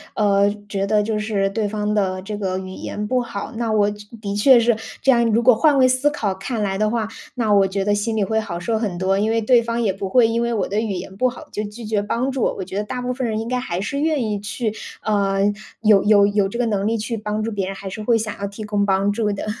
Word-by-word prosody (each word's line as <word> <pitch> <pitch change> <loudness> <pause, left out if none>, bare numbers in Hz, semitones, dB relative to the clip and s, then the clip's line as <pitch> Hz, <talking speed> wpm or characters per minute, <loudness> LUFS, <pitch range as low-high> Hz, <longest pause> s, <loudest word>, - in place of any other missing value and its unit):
呃， 200 -1 +3 0.2
觉 200 -1 -2
得 210 0 +2
就 215 0 -1
是 210 -2 0
对 215 0 -1
方 210 0 -2
的 190 -3 0
这 210 +2 -5
个 190 -3 -2
语 190 0 -6
言 210 +2 -5
不 250 +3 +1
好， 205 -3 -6
那 230 -1 -1
我 210 -1 +3
确 205 0 -10 0.2
的 200 0 -3
确 240 +4 +6
是 235 0 +3 0.3
这 270 - +6
样 235 -2 +4
如 230 +2 +2
果 250 0 +7
换 290 +5 +3
位 255 -1 +6
思 255 +3 +2
考 215 -9 -2
看 210 +4 -3
来 195 -1 -1
的 215 0 +2
话， 225 -1 -1 0.3
那 225 -4 +1
我 195 -1 +5
觉 195 +1 -2
得 205 - +2
心 220 +2 -1
里 210 - +2
会 220 +3 0
好 195 -6 -4
受 220 +4 -1
很 205 -6 -2
多， 190 +2 +1
因 215 +2 +1
为 225 0 +2
对 235 +2 +4
方 230 0 -2
也 210 -5 +1
不 195 0 -5
会 240 +1 +5
因 230 +1 0
为 235 0 0
我 210 -5 0
的 205 - -1
语 220 -3 -2
言 185 +1 -6
不 255 +4 +2
好 245 - -11
就 210 - -3
拒 220 +3 -9
绝 210 -1 0
帮 235 +6 -1
助， 260 - -3
我 195 - 0
觉 190 +1 -8
得 205 - 0
大 250 +4 -5
部 250 0 -1
分 255 -1 -2
人 215 -1 -1
应 225 - -4
该 250 +1 -1
还 185 -9 -3
是 280 +7 -3
愿 305 -3 +1
意 210 -2 -2
去， 210 +2 -3 0.3
呃， 200 -2 +1 0.4
有 210 -3 +5
有 205 -1 +5
有 200 -1 +1
这 235 - -5
个 245 - +1
能 205 -2 0
力 230 - +1
去 225 +2 -3
帮 210 0 -3
助 225 - -2
别 200 -3 -2
人， 195 - -5
还 195 0 -8
是 205 +3 -6
会 230 +2 +3
想 215 -1 -3
要 200 - -2
提 200 +2 -8
供 205 -1 0
帮 195 0 +2
助 210 0 0
的。 200 - -4
210 Hz, 305 characters per minute, -21 LUFS, 200-230 Hz, 0.4 s, 果